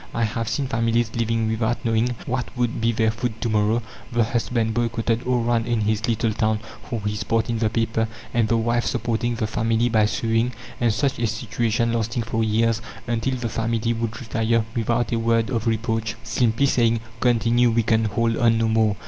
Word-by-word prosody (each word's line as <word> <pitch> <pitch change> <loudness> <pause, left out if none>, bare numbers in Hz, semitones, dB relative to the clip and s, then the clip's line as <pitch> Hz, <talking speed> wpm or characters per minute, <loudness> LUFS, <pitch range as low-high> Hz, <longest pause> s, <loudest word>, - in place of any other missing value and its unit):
I 115 - +1
have 115 0 -1
seen 140 - -1
families 115 -2 +1
living 115 -1 0
without 110 +3 -1
knowing 115 +2 +1
what 125 0 -2
would 120 -2 -1
be 115 0 +3
their 110 -1 +2
food 115 0 -4
to 115 - 0
morrow, 110 +2 +2 0.3
the 120 -1 +2
husband 115 0 0
boycotted 115 0 -1
all 125 -1 +2
round 115 0 +1
in 120 -2 +1
his 110 +1 0
little 115 -1 +1
town 110 0 +1 0.3
for 115 -3 -3
his 105 0 -2
part 115 +1 0
in 115 - -1
the 110 -1 +2
paper, 115 0 0 0.3
and 115 -2 +2
the 115 +1 +2
wife 120 +1 +1
supporting 120 0 -1
the 110 -1 -1
family 115 +2 +1
by 110 -2 +3
sewing, 115 +2 0 0.3
and 120 -2 +3
such 130 +3 0
a 115 - +1
situation 115 +1 -1
lasting 115 +1 -1
for 115 0 -1
years, 110 +1 +1 0.2
until 120 +3 -1
the 120 -2 -3
family 115 +1 -1
would 115 0 -3
retire, 115 -1 0
without 120 +1 0
a 115 - +1
word 115 +1 +1
of 115 -2 -1
reproach, 115 -1 -1
simply 115 +2 +1
saying: 115 -4 +2 0.2
"Continue; 120 0 +3
we 115 0 +2
can 110 0 +2
hold 115 +2 +1
on 115 -1 +3
no 115 0 +2
more!" 110 -2 +2
115 Hz, 200 wpm, -23 LUFS, 110-120 Hz, 0.3 s, be